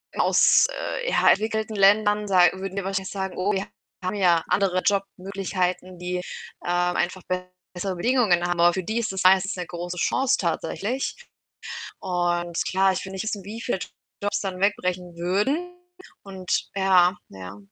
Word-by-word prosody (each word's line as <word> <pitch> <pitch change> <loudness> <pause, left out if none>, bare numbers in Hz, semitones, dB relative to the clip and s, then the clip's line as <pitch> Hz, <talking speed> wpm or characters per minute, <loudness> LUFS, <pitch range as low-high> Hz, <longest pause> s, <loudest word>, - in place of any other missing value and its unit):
mal - - +2
aus, - - +5
äh, - - -3
ja, - - +4
entwickelten 220 +1 +1
Ländern, 205 +1 +4
sa 185 -2 +5
würden 190 0 -6
wir 200 - -2
wahrscheinlich 195 -1 -2
sagen: 190 -2 -4
Oh, 190 +3 +1
wir 195 0 -2 0.4
haben 185 +3 -2
ja 175 -5 +3
andere 185 -2 +2
Jobmöglichkeiten, 190 -2 -2
die, 180 +1 -3 0.5
ähm, 175 0 0
einfach 180 +1 -1 0.5
bessere 185 +1 -3
Bedingungen 200 -4 +2
ha 175 - -1
Aber 175 0 +4
für 190 - -2
die 220 +6 -2
ist 225 -3 -2
es 190 - -2
meistens 190 +1 +4
'ne 180 -1 -4
große 175 +1 -6
Chance 265 +9 +2
tatsächlich 200 +8 -2 0.8
und 175 -2 -1
klar, 190 +1 +3
ich 185 - -4
will 190 - -8
nicht 190 +2 -4
wissen, 205 -3 -3
wie 215 +3 -7
viele 230 - -2 0.4
Jobs 205 0 0
dann 190 -2 -4
wegbrechen 180 -3 -1
würden 210 - 0 0.5
und 190 -2 -3
ja, 185 -2 +4
ja, 95 0 -9
190 Hz, 165 wpm, -24 LUFS, 180-205 Hz, 0.8 s, aus